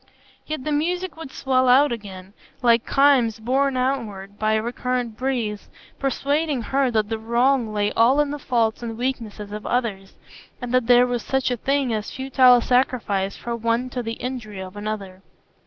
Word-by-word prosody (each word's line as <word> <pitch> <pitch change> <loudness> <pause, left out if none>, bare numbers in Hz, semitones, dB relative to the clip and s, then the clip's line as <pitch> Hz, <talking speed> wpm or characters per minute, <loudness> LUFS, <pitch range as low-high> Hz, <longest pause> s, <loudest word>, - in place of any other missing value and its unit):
Yet 310 -4 -4
the 305 - -2
music 350 +4 -1
would 320 -3 -9
swell 260 -1 +1
out 270 +3 +5
again, 195 -4 -7 0.3
like 235 -1 +3
chimes 265 -6 +3
borne 265 +4 +1
onward 215 -7 -3
by 215 0 +1
a 220 - +2
recurrent 245 -1 -2
breeze, 235 -5 -3 0.3
persuading 280 0 0
her 270 +1 +1
that 215 -3 0
the 225 -1 -2
wrong 235 +1 +1
lay 205 -1 0
all 245 +5 +4
in 295 -1 +1
the 295 - -5
faults 230 -4 0
and 225 -2 -5
weaknesses 230 -5 -4
of 210 +1 -6
others, 210 -6 -2 0.4
and 245 -1 -5
that 255 -2 +2
there 245 0 +6
was 245 -1 -2
such 265 -1 0
a - - +1
thing 270 0 0
as 215 -1 -3
futile 260 -2 +5
sacrifice 230 -6 0
for 235 0 -4
one 235 +2 -1
to 250 - -3
the 225 -1 -4
injury 230 -5 -6
of 190 +1 -8
another. 205 -3 -5
245 Hz, 175 wpm, -23 LUFS, 215-265 Hz, 0.4 s, there